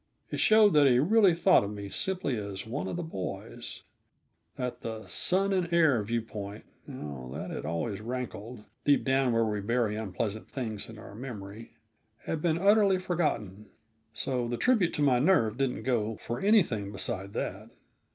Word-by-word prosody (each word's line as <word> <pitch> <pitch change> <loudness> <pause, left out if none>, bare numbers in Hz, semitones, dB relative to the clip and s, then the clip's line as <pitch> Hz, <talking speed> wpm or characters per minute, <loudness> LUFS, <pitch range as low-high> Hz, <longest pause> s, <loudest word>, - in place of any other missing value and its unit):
It - - -3
showed 215 -2 +6
that 145 -2 +6
he 125 -2 +5
really 190 - +5
thought 185 - +5
of 100 - -3
me 100 -1 -6
simply 185 - -1
as 100 -3 -5
one 125 +6 -4
of - - -3
the 175 - -3
boys; 95 - -6 0.7
that 125 -1 -4
the 110 -1 -5
"son 190 - +2
and 180 -3 0
heir" 160 -9 +4
view 115 +2 -2
point 105 -1 -8 0.2
oh, 70 - -7
that - - -5
had - - -5
always 85 +6 -3
rankled, 120 -1 -6 0.2
deep 145 -1 +3
down 135 -1 +2
where 115 0 +2
we 105 -1 -1
bury 115 0 0
unpleasant 110 +1 -4
things 110 -6 -5
in 110 - -10
our 110 -2 -11
memory 110 -2 -8 0.5
had 160 - -2
been 165 -1 +1
utterly 200 +1 +4
forgotten. 150 - -2 0.4
So 120 +2 -2
the 120 0 -2
tribute 215 - +2
to 150 - 0
my 130 -4 +4
nerve 135 - +3
didn't 135 -2 -1
go 115 -4 0
for 120 +1 -5
anything 165 - +3
beside 100 0 -2
that. - - -4
120 Hz, 170 wpm, -29 LUFS, 105-160 Hz, 0.7 s, showed